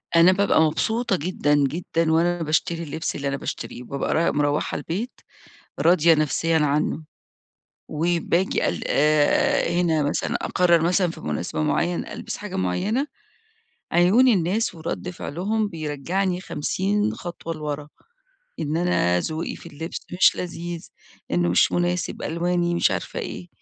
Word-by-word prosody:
أنا 170 Hz, +2 st, +7 dB
بابقى 195 Hz, -4 st, +3 dB
مبسوطة 220 Hz, +9 st, +1 dB
جدًا، 155 Hz, -3 st, 0 dB
جدًا، 160 Hz, +3 st, 0 dB
وأنا 170 Hz, +1 st, +2 dB
باشتري 165 Hz, +2 st, 0 dB
اللبس 160 Hz, +1 st, -4 dB
اللي 140 Hz, 0 st, -3 dB
أنا 140 Hz, -, -1 dB
باشتريه، 125 Hz, -, -6 dB
وبابقى 140 Hz, +2 st, -2 dB
رايح 165 Hz, +1 st, +2 dB
مروّحة 145 Hz, 0 st, 0 dB
البيت 205 Hz, +10 st, -4 dB, 0.7 s
راضية 170 Hz, -1 st, +5 dB
نفسيًا 155 Hz, +2 st, +1 dB
عنه، 150 Hz, +1 st, 0 dB, 0.9 s
وباجي 170 Hz, +3 st, 0 dB
ال -, -, -4 dB, 0.9 s
هنا 165 Hz, -4 st, +2 dB
مثلًا 145 Hz, -, -1 dB
أقرر 175 Hz, -2 st, +3 dB
مثلًا 175 Hz, +1 st, +2 dB
في -, -, -11 dB
مناسبة 75 Hz, 0 st, -3 dB
معينة، 170 Hz, -, -1 dB
ألبس -, -, -6 dB
حاجة 205 Hz, -2 st, -7 dB
معينة، 195 Hz, -, 0 dB, 0.9 s
عيون 195 Hz, +9 st, +5 dB
الناس 200 Hz, 0 st, +1 dB
ورد 170 Hz, +2 st, -4 dB
فعلهم 200 Hz, +6 st, -2 dB
بيرجعني 175 Hz, +3 st, -2 dB
50 200 Hz, +5 st, -1 dB
خطوة 170 Hz, -1 st, -6 dB
لورا، 150 Hz, -1 st, -5 dB, 0.7 s
إن 155 Hz, +1 st, -1 dB
أنا 90 Hz, -, +2 dB
ذوقي 160 Hz, -, -3 dB
في -, -, -14 dB
اللبس 160 Hz, +3 st, -6 dB
مش 180 Hz, +1 st, +4 dB
لذيذ، 175 Hz, -1 st, -6 dB, 0.4 s
إنه 85 Hz, 0 st, +2 dB
مش 90 Hz, -, +4 dB
مناسب، 175 Hz, 0 st, -1 dB
ألواني 175 Hz, +1 st, 0 dB
مش -, -, +3 dB
عارفة -, -, -3 dB
إيه، 180 Hz, -, -6 dB
170 Hz, 130 wpm, -23 LUFS, 150-180 Hz, 0.9 s, أنا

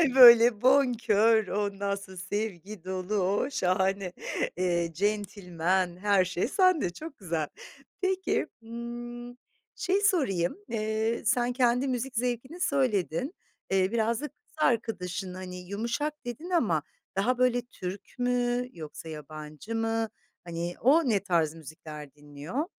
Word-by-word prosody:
böyle 235 Hz, -3 st, +9 dB
bonkör, 230 Hz, -5 st, +4 dB
ondan 200 Hz, 0 st, -1 dB
sonra 195 Hz, -1 st, -10 dB
sevgi 200 Hz, 0 st, -4 dB
dolu, 185 Hz, +2 st, -3 dB
o, 200 Hz, +6 st, +1 dB
şahane, 190 Hz, -4 st, 0 dB, 0.4 s
eee, 175 Hz, -2 st, +1 dB
centilmen, 185 Hz, -2 st, 0 dB
her 200 Hz, -1 st, +3 dB
şey 185 Hz, +2 st, -1 dB
sende 365 Hz, -, +3 dB
çok 305 Hz, -, -9 dB
güzel. 165 Hz, -6 st, -2 dB, 0.5 s
Peki, 380 Hz, 0 st, 0 dB, 0.2 s
hımm, 240 Hz, +1 st, -7 dB, 0.4 s
şeyi 385 Hz, +2 st, +1 dB
sorayım, 260 Hz, -, +2 dB
eee, 220 Hz, +1 st, -1 dB
sen 245 Hz, +1 st, +2 dB
kendi 250 Hz, +1 st, +2 dB
müzik 255 Hz, +1 st, -2 dB
zevkini 250 Hz, +7 st, -2 dB
söyledin, 255 Hz, -, +1 dB, 0.4 s
eee, 190 Hz, 0 st, +3 dB
biraz 230 Hz, +1 st, +1 dB
da 300 Hz, -, -3 dB
kız 295 Hz, -, -26 dB
arkadaşın, 195 Hz, -, 0 dB
hani, 185 Hz, 0 st, -7 dB
"yumuşak" 235 Hz, +9 st, -2 dB
dedin 245 Hz, +9 st, -6 dB
ama 210 Hz, -, +2 dB, 0.3 s
daha 240 Hz, +6 st, +2 dB
böyle, 250 Hz, -1 st, +3 dB
Türk 195 Hz, -5 st, -8 dB
mü 245 Hz, 0 st, +1 dB
yoksa 160 Hz, 0 st, -8 dB
yabancı 155 Hz, +6 st, -7 dB
mı, 225 Hz, 0 st, 0 dB, 0.3 s
hani, 170 Hz, 0 st, -4 dB
o 285 Hz, +3 st, +5 dB
ne 210 Hz, -3 st, +3 dB
tarz 170 Hz, -5 st, +2 dB
müzikler 150 Hz, -2 st, -10 dB
dinliyor? 150 Hz, -, -5 dB
215 Hz, 125 wpm, -28 LUFS, 180-245 Hz, 0.5 s, böyle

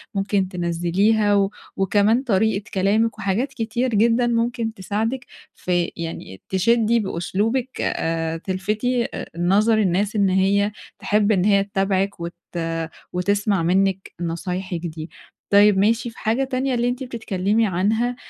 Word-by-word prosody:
ممكن 195 Hz, -1 st, 0 dB
تنزِّليها، 185 Hz, +4 st, +1 dB
و 195 Hz, 0 st, +2 dB, 0.3 s
وكمان 205 Hz, +6 st, +2 dB
طريقة 210 Hz, -3 st, +1 dB
كلامِك 210 Hz, +4 st, +1 dB
وحاجات 220 Hz, +7 st, -1 dB
كتير 235 Hz, +2 st, -1 dB
جدًا 235 Hz, +3 st, +3 dB
ممكن 235 Hz, -1 st, -1 dB
تساعدِك 225 Hz, +5 st, -3 dB, 0.3 s
في 175 Hz, -1 st, -1 dB
يعني 165 Hz, -, -7 dB
تشدّي 230 Hz, +4 st, +2 dB
بأسلوبِك 210 Hz, +7 st, -1 dB
آآ 165 Hz, 0 st, -1 dB
تلفتي 210 Hz, +7 st, -1 dB
آآ -, -, -6 dB
نظر 205 Hz, +6 st, +3 dB
الناس 200 Hz, +1 st, +1 dB
إن 200 Hz, -2 st, +3 dB
هي 200 Hz, +2 st, +2 dB, 0.3 s
تحب 210 Hz, +1 st, +2 dB
إن 185 Hz, -2 st, +2 dB
هي 200 Hz, -1 st, +4 dB
تتابعِك، 195 Hz, -1 st, -1 dB
وت 170 Hz, +1 st, -5 dB, 0.8 s
وتسمع 200 Hz, 0 st, +1 dB
منِك 190 Hz, +2 st, +1 dB
نصايحِك 175 Hz, +1 st, -3 dB
دي. 160 Hz, 0 st, -6 dB, 0.4 s
طيب 205 Hz, 0 st, +6 dB
ماشي 225 Hz, +4 st, +2 dB
في 225 Hz, -, -16 dB
حاجة 230 Hz, +5 st, 0 dB
تانية 260 Hz, 0 st, -1 dB
اللي 240 Hz, 0 st, +1 dB
أنتِ 250 Hz, +2 st, -3 dB
بتتكلمي 220 Hz, -3 st, 0 dB
عنها 220 Hz, +7 st, 0 dB
205 Hz, 130 wpm, -22 LUFS, 185-225 Hz, 0.8 s, طيب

